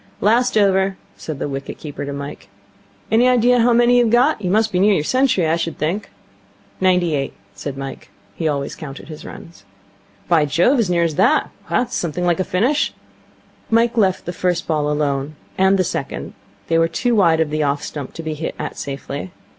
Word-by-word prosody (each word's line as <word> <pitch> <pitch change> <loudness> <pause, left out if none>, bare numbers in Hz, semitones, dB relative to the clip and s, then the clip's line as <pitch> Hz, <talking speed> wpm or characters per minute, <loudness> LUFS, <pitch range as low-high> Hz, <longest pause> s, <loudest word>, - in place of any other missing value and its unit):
'Last 235 +3 +2
over,' 190 -1 +3 0.2
said 155 -3 -6
the - - -3
wicket 135 -1 -6
keeper 145 -2 -6
to 140 - -5
Mike. 140 -5 -7 0.6
'Any 235 +3 +5
idea 245 0 +4
how 240 +1 +4
many 240 +1 +5
you've 240 -2 +3
got? 245 +2 +3
You 185 - -1
must 220 +3 +2
be 180 - 0
near 205 +1 +4
your 150 - 0
century, 255 - +2
I 160 +1 +2
should 165 -1 -3
think.' 185 +7 -2 0.7
'Ninety 180 -3 +3
eight,' 135 -2 -2 0.2
said 140 -2 -6
Mike. 135 0 -7 0.2
He 160 - -2
always 140 -2 -2
counted 140 -2 -9
his 155 -1 -9
runs. 165 -11 -11 0.6
'By 165 -4 +4
Jove, 175 - +3
as 215 -6 +1
near 170 -1 +2
as 165 -2 0
that? - - +3 0.2
This 245 -1 +1
is - - -10
something 175 +1 -2
like 175 -1 +1
a - - +2
finish.' 240 +13 0 0.7
Mike 230 +1 +3
left 190 -5 +1
the 175 - -4
first 180 0 -1
ball 150 -2 0
alone, 145 0 -1 0.2
and 190 +1 +3
the 185 - +2
second. - - -4 0.3
They 165 - +2
were 165 - +4
too 240 +9 0
wide 170 -7 +4
of 160 -2 0
the 155 0 0
off 145 -1 0
stump 145 -3 -6
to 165 - -6
be 160 -1 -3
hit 155 +2 -5
at - - -5
safely. 140 +4 -5
175 Hz, 200 wpm, -20 LUFS, 150-220 Hz, 0.7 s, Any